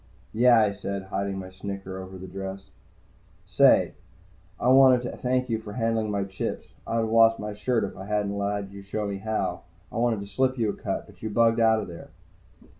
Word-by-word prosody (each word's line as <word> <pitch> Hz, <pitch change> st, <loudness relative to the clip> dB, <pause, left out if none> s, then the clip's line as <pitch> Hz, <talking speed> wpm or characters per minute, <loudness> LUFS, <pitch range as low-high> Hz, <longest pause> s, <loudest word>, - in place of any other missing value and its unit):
"Yeah," 120 Hz, +1 st, +6 dB
I 105 Hz, -2 st, +3 dB
said, 100 Hz, -1 st, -5 dB
hiding 100 Hz, +1 st, -3 dB
my 95 Hz, -1 st, -7 dB
snicker 95 Hz, 0 st, -6 dB
over 95 Hz, 0 st, -8 dB
the 95 Hz, -, -9 dB
dress. 95 Hz, +1 st, -7 dB, 0.7 s
"Say, -, -, +4 dB, 0.7 s
I 125 Hz, -, +2 dB
wanted 130 Hz, -1 st, +6 dB
to -, -, -5 dB
thank 125 Hz, 0 st, 0 dB
you 115 Hz, -2 st, -1 dB
for 105 Hz, -2 st, -9 dB
handling 115 Hz, -1 st, 0 dB
my 100 Hz, -1 st, 0 dB
chips. 95 Hz, -1 st, -5 dB, 0.2 s
I'd -, -, -2 dB
have 110 Hz, -, -1 dB
lost 115 Hz, 0 st, +6 dB
my 105 Hz, 0 st, -5 dB
shirt 115 Hz, +3 st, 0 dB
if 100 Hz, -, -4 dB
I 95 Hz, -, -8 dB
hadn't 105 Hz, -1 st, -1 dB
let 100 Hz, -1 st, -2 dB
you 100 Hz, 0 st, -9 dB
show 105 Hz, +2 st, -4 dB
me 100 Hz, -1 st, -3 dB
how. 110 Hz, +2 st, -2 dB, 0.3 s
I -, -, -6 dB
wanted 115 Hz, -3 st, +1 dB
to -, -, -6 dB
slip 130 Hz, +6 st, 0 dB
you 110 Hz, -3 st, +1 dB
a -, -, -7 dB
cut, -, -, -4 dB
but -, -, -19 dB
you 110 Hz, -, -3 dB
bugged 115 Hz, +2 st, +3 dB
out 110 Hz, -1 st, +4 dB
of -, -, -6 dB
there." 85 Hz, -1 st, -10 dB
105 Hz, 210 wpm, -26 LUFS, 100-115 Hz, 0.7 s, Yeah